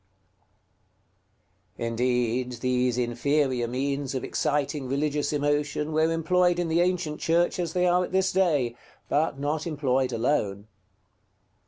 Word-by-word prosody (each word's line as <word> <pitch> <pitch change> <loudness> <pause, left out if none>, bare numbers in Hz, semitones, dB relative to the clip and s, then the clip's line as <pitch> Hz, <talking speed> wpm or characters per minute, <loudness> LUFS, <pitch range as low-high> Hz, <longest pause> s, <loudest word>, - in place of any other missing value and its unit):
§ - - -3
XXI. - - 0
Indeed, 125 +1 0
these 125 0 0
inferior 125 +1 0
means 135 +2 -2
of 130 - -2
exciting 145 -2 -1
religious 145 +2 -1
emotion 145 +1 0
were 160 +1 +2
employed 175 +2 +2
in 175 -1 -1
the 165 +2 +3
ancient 175 -4 -1
Church 170 +2 +1
as 170 -2 -2
they 180 0 +2
are 180 0 +3
at - - -11
this 190 0 +2
day, 150 -11 +1 0.3
but 150 -1 +1
not 150 +3 -2
employed 135 -4 0
alone. 105 -5 -1
145 Hz, 135 wpm, -26 LUFS, 125-165 Hz, 0.3 s, the